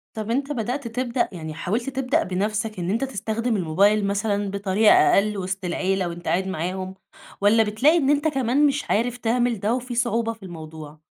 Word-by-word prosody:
طب 220 Hz, +1 st, -4 dB
أنتَ 275 Hz, +3 st, -1 dB
بدأت 245 Hz, +1 st, -3 dB
تبدأ 245 Hz, +1 st, -1 dB
يعني 160 Hz, -3 st, -7 dB
حاولت 220 Hz, -, -2 dB
تبدأ 270 Hz, +3 st, 0 dB
بنفْسك 210 Hz, +2 st, -2 dB
إن 175 Hz, +1 st, -2 dB
أنتَ 230 Hz, +6 st, 0 dB
تستخدم 230 Hz, -1 st, -2 dB
الموبايل 200 Hz, +5 st, +2 dB
مثلًا 200 Hz, 0 st, -1 dB
بطريقة 200 Hz, +2 st, +3 dB
أقل 210 Hz, +1 st, +4 dB
وسط 190 Hz, 0 st, -4 dB
العيلة 185 Hz, +1 st, 0 dB
وأنتَ 170 Hz, 0 st, -8 dB
قاعد 190 Hz, +2 st, +1 dB
معاهم؟ 185 Hz, +2 st, -4 dB, 0.5 s
والّا 215 Hz, +3 st, +5 dB
بتلاقي 250 Hz, +10 st, +3 dB
إن 280 Hz, -4 st, +1 dB
أنتَ 290 Hz, +2 st, +2 dB
كمان 270 Hz, 0 st, +2 dB
مش 280 Hz, 0 st, 0 dB
عارف 240 Hz, +3 st, +1 dB
تعمل 240 Hz, -1 st, 0 dB
ده 215 Hz, +4 st, 0 dB
وفي 250 Hz, -1 st, -4 dB
صعوبة 230 Hz, -1 st, 0 dB
في 220 Hz, -3 st, -18 dB
الموضوع؟ 155 Hz, -3 st, -9 dB
215 Hz, 180 wpm, -23 LUFS, 190-245 Hz, 0.5 s, والّا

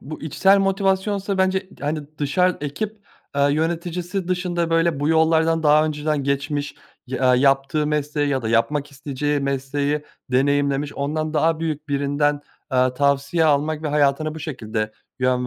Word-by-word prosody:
bu 155 Hz, +3 st, -9 dB
içsel 190 Hz, +6 st, +3 dB
motivasyonsa 195 Hz, 0 st, 0 dB
bence 190 Hz, 0 st, +1 dB
t -, -, -18 dB
hani, 155 Hz, +1 st, -1 dB, 0.2 s
dışar 180 Hz, +6 st, +1 dB
ekip, 200 Hz, +10 st, -4 dB, 0.3 s
aaa, 140 Hz, 0 st, +3 dB
yöneticisi 170 Hz, +4 st, -2 dB
dışında, 175 Hz, -2 st, -1 dB
böyle, 165 Hz, -3 st, +2 dB
bu 145 Hz, -, +1 dB
yollardan 160 Hz, 0 st, +3 dB
daha 150 Hz, 0 st, +5 dB
önceden 150 Hz, -2 st, -1 dB
geçmiş 145 Hz, +1 st, -2 dB, 0.3 s
ya 130 Hz, 0 st, +2 dB
yaptığı 135 Hz, +3 st, +2 dB
mesleği 150 Hz, -1 st, -1 dB
ya 135 Hz, -3 st, 0 dB
da 110 Hz, -, -2 dB
yapmak 140 Hz, +6 st, +1 dB
isteyeceği 145 Hz, +1 st, -2 dB
mesleği 140 Hz, +2 st, -1 dB, 0.3 s
deneyimlemiş 140 Hz, +2 st, +1 dB
ondan 155 Hz, +2 st, -2 dB
daha 160 Hz, +1 st, +2 dB
büyük 155 Hz, -2 st, -3 dB
birinden, 145 Hz, +1 st, 0 dB, 0.3 s
aaa, 130 Hz, -1 st, +2 dB
tavsiye 140 Hz, +4 st, +1 dB
almak 150 Hz, +1 st, +1 dB
ve 155 Hz, -, -2 dB
hayatına 150 Hz, +1 st, +1 dB
bu 160 Hz, -, -8 dB
şekilde 110 Hz, -7 st, -4 dB, 0.3 s
yön 125 Hz, -1 st, +1 dB
150 Hz, 145 wpm, -22 LUFS, 140-165 Hz, 0.3 s, daha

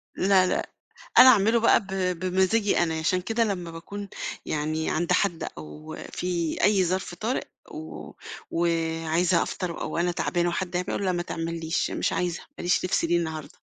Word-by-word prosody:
لا، 190 Hz, -1 st, +4 dB
لأ، -, -, -1 dB, 0.5 s
أنا 260 Hz, -, +11 dB
أعمله 225 Hz, 0 st, +5 dB
بقى 230 Hz, -, +5 dB
ب 200 Hz, -, -13 dB, 0.3 s
بمزاجي 190 Hz, +3 st, +2 dB
أنا، 160 Hz, -2 st, 0 dB
عشان 180 Hz, +3 st, +1 dB
كده 225 Hz, +4 st, 0 dB
لمّا 180 Hz, -6 st, -3 dB
باكون 200 Hz, +4 st, -8 dB, 0.4 s
يعني 155 Hz, +1 st, -1 dB
عند 175 Hz, +2 st, -1 dB
حد 175 Hz, -4 st, 0 dB
أو 75 Hz, 0 st, -9 dB, 0.2 s
في 170 Hz, -3 st, -2 dB
أي 200 Hz, -3 st, +4 dB
ظرف 185 Hz, 0 st, -2 dB
طارئ 225 Hz, +8 st, -2 dB, 0.3 s
و 155 Hz, +1 st, -8 dB, 0.4 s
وعايزة 165 Hz, +1 st, +1 dB
أفطر 175 Hz, -3 st, -4 dB
أو 155 Hz, -, -3 dB
أنا 175 Hz, +1 st, +1 dB
تعبانة 175 Hz, 0 st, 0 dB
وحد 175 Hz, +1 st, -3 dB
هيعمل 180 Hz, +2 st, -1 dB
أقول 200 Hz, -, -2 dB
لا 185 Hz, -, +2 dB
ما 175 Hz, -1 st, -1 dB
تعمل 165 Hz, 0 st, -4 dB
ليش 160 Hz, +2 st, -1 dB
مش -, -, -1 dB
عايزة، 175 Hz, -1 st, -1 dB, 0.2 s
ماليش 175 Hz, +1 st, +1 dB
نِفْس 180 Hz, -, +1 dB
ليه 170 Hz, +1 st, +2 dB
النهارده. 160 Hz, -2 st, -4 dB
175 Hz, 170 wpm, -26 LUFS, 165-190 Hz, 0.5 s, أنا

